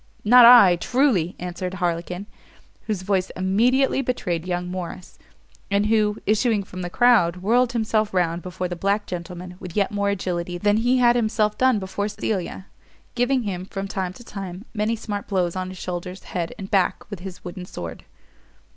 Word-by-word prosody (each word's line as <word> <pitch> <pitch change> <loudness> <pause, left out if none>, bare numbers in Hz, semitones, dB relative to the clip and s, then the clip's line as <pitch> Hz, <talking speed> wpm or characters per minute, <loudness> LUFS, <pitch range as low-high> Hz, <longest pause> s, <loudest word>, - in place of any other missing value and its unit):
"Not 245 +2 +8
I 205 -8 +8
truly!" 235 - +1
answered 180 +1 -5
Harlequin, 180 +1 -2 0.6
whose 205 -4 -2
voice 190 -1 0
immediately 245 +9 +2
betrayed 180 -10 -2
young 180 0 -2
Morrice, 180 0 -7 0.5
and 200 0 +2
who, 210 -1 +2
issuing 215 0 +2
from 185 -1 -8
the 175 - -4
crowd, 215 -6 +4
whirled 240 +3 +3
himself 220 -2 0
round 175 -2 0
before 180 0 -4
the 175 - -5
black 200 +4 0
gentleman 180 0 -7
with 180 -2 -9
yet 200 -2 +1
more 200 -1 0
agility 175 -2 -2
than 205 +3 +2
he 245 +3 +2
had 240 -1 +5
himself 215 -2 +1
done 255 -3 +3
before 200 +1 -3
Cecilia, 200 -3 -3 0.5
giving 250 +1 +1
him, 185 -4 -3
from 195 0 -5
time 190 -2 -3
to 240 - -13
time, 195 -2 -7
many 215 +1 0
smart 205 -2 -5
blows 180 -3 0
on 185 0 -3
his 185 - -9
shoulders, 180 +1 -6
head, 170 -2 -4
and 195 -2 -8
back, 195 -3 +1
with 200 - -5
his 185 0 -9
wooden 180 0 -7
sword. 85 - -7
195 Hz, 175 wpm, -23 LUFS, 180-220 Hz, 0.6 s, Not